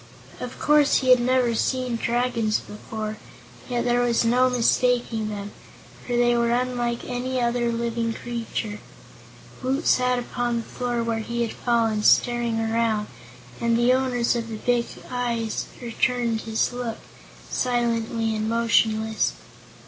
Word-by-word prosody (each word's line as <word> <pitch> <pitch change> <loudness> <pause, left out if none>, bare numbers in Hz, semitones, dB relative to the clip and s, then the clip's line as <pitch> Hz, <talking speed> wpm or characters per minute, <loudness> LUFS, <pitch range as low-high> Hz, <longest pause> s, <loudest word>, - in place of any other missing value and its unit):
Of 250 0 -6
course 295 -2 +4
he 260 - 0
had 250 - +7
never 250 -1 +2
seen 255 +1 0
Dragons 235 -2 0
before, 215 0 -6 0.5
yet 240 -1 -1
there 245 0 +2
was 240 -1 +2
no 250 +2 +4
mistaking 245 -2 +1
them, 205 -1 -6 0.5
for 245 - -4
they 240 0 +4
were 235 0 +2
unlike 240 -1 -1
any 255 +1 -2
other 240 0 +1
living 230 0 -1
creatures. 225 -3 -4 0.8
Woot 270 +5 -1
sat 250 0 +3
upon 240 -1 -2
the 230 - -2
floor 240 -1 -2
where 230 -1 -1
he 235 +2 -2
had 230 - -3
fallen, 225 -3 +1
staring 240 0 +3
around, 225 -1 0 0.5
and 235 0 +2
the 240 +2 +4
owners 250 -2 +1
of 230 -1 -2
the 220 -1 -5
big 240 +1 +1 0.2
eyes 235 -3 -2
returned 235 -1 0
his 225 +2 -1
look, 245 -2 -4 0.5
silently 230 -2 0
and 215 0 -1
motionless. 220 -1 +2
235 Hz, 140 wpm, -24 LUFS, 225-245 Hz, 0.8 s, had